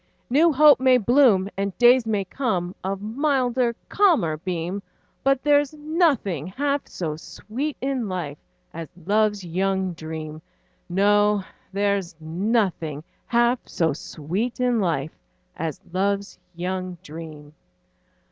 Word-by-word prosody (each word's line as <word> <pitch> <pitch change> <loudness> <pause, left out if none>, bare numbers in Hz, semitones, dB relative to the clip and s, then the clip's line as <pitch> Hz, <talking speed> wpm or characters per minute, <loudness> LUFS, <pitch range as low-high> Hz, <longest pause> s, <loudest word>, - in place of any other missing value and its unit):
New 320 +6 +5
hope 300 0 +7
may 260 -1 +5
bloom, 235 -4 +4
And 195 -1 -3
days 245 -1 +6
may 205 -3 0
come, 185 -6 -2
Of 195 +1 -3
milder, 250 0 +1
calmer 325 - +3
beam, 180 +3 -3 0.4
But 275 -1 +2
there's 290 0 +3
nothing 295 - +1
half 280 +8 -1
so 160 -4 -4
sweet 255 - -5
in 260 -5 -1
life 160 -6 -4 0.3
As 165 -2 -7 0.2
love's 210 0 +2
young 190 +1 -1
dream; 155 -1 -7 0.5
No, 205 +2 +3 0.3
there's 200 -3 0
nothing 165 -3 -1 0.2
half 240 +1 +3
so 160 -3 0
sweet 180 - -4
in 245 -2 +2
life 160 -6 -1 0.4
As 160 -2 -4
love's 200 +2 -1 0.2
young 185 +1 -3
dream. 150 -1 -10
200 Hz, 120 wpm, -24 LUFS, 175-250 Hz, 0.5 s, hope